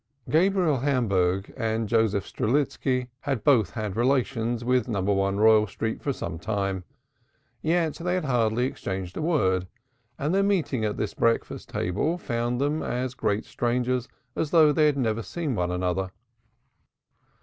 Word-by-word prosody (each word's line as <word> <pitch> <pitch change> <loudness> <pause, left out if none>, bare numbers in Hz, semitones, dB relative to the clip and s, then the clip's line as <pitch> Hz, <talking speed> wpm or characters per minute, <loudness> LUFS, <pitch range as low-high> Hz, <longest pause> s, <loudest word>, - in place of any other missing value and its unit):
Gabriel 175 -2 +3
Hamburg 100 -8 +1
and 115 -2 -1
Joseph 110 -3 +2
Strelitski 130 0 0
had 135 -6 -2
both 120 - +4
had 105 +3 -4
relations 120 -2 0
with 125 -1 +2
No. 110 -5 -1
1 100 0 +1
Royal 110 0 +5
Street 110 +3 -4
for 140 - -1
some 80 -10 -5
time, 100 -1 -2 0.8
yet 165 -1 +1
they 180 +1 -1
had 180 -4 -1
hardly 120 -2 +1
exchanged 95 -7 -4
a - - -3
word 95 - +1 0.5
and 150 +5 -1
their 195 - +3
meeting 180 - +1
at 105 -1 -1
this 105 - -2
breakfast 115 0 0
table 105 - -1
found 120 -5 -2
them 145 +3 0
as 125 +1 -2
great 105 -3 -1
strangers 125 +1 -1 0.3
as 155 - -1
though 155 -2 +6
they 150 +1 +4
had 145 -2 +1
never 115 -4 0
seen 160 +5 -3
each 105 - -2
other. 90 +1 -1
120 Hz, 150 wpm, -26 LUFS, 105-145 Hz, 0.8 s, though